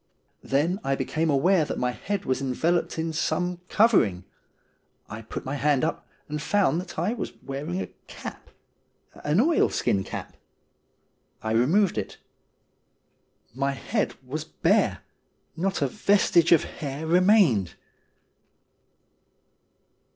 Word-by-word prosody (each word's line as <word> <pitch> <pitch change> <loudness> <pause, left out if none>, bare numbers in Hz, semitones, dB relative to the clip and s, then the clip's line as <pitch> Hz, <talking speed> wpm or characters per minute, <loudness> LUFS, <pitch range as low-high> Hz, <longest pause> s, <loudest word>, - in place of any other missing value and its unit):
Then 160 +8 0
I 135 0 +1
became 155 +5 -1
aware 160 +5 +3
that - - -4
my 125 0 0
head 200 +9 -4
was 130 +1 0
enveloped 160 +8 0
in 160 0 -2
some 175 +2 -1
covering. 155 - +3 0.8
I 110 +1 -7
put 110 - -7
my 135 - -3
hand 145 -1 +2
up, 160 - -2 0.2
and 150 0 -4
found 180 -3 +2
that 185 - -11
I 180 +8 0
was 245 - -5
wearing 135 -9 -4
a 95 - -2 0.2
cap - - -9 0.4
— - - -41
an 150 +5 +2
oilskin 250 - +2
cap. - - -7 1.1
I 110 - -2
removed 160 - +3
it. - - -6 1.4
My 140 +2 -1
head 205 - -2
was 150 +4 -4
bare; - - +1 0.5
not 190 -2 -1
a - - +2
vestige 195 -2 +3
of 170 - +6
hair 145 +1 -6
remained. 175 - +4
155 Hz, 125 wpm, -26 LUFS, 135-180 Hz, 1.4 s, of